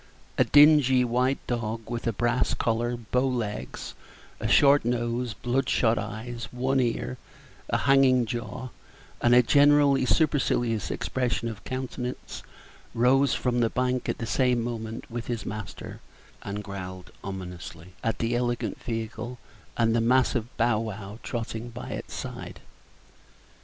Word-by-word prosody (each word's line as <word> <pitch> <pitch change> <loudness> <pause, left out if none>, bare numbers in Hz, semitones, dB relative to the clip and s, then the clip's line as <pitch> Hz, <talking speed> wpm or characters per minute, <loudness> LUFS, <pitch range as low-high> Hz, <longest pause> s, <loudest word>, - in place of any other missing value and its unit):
A - - +7
dingy 145 -4 +6
white 125 +3 +1
dog, 115 -2 -3
with 120 0 -4
a - - +3
brass 120 +3 +1
collar, 120 +1 0
bow 125 +3 0
legs, 105 - -4 0.5
a - - -2
short 145 0 +6
nose, 120 -1 -1
bloodshot 120 -1 +1
eyes, 110 +2 -5
one 130 +2 0
ear, 125 0 -1 0.5
a - - +2
hanging 130 -2 +4
jaw, 120 +2 -5 0.5
and 120 0 +5
a 125 - +7
generally 140 0 +5
supercilious 120 - +1
expression 120 -2 -1
of 110 -2 -8
countenance, 130 -1 -5 0.5
rose 130 +3 +4
from 125 -1 0
the 115 -1 +3
bank 125 +1 -1
at - - -1
the 115 - -4
same 125 0 +2
moment 115 -1 -5
with 120 0 -5
his 115 -4 -3
master, 105 -1 -7 0.4
and 100 +1 -5
growled 95 -2 -7
ominously 90 -2 -8
at 115 -3 0
the 115 +1 0
elegant 120 0 -1
vehicle 115 +1 -4 0.4
and 115 -1 +3
the 115 - +3
mastiff 125 -1 +2
Bow 120 -2 +2
wow 105 -1 -6
trotting 115 0 -4
by 120 +1 -8
its - - -6
side. - - -7
120 Hz, 135 wpm, -27 LUFS, 110-125 Hz, 0.5 s, A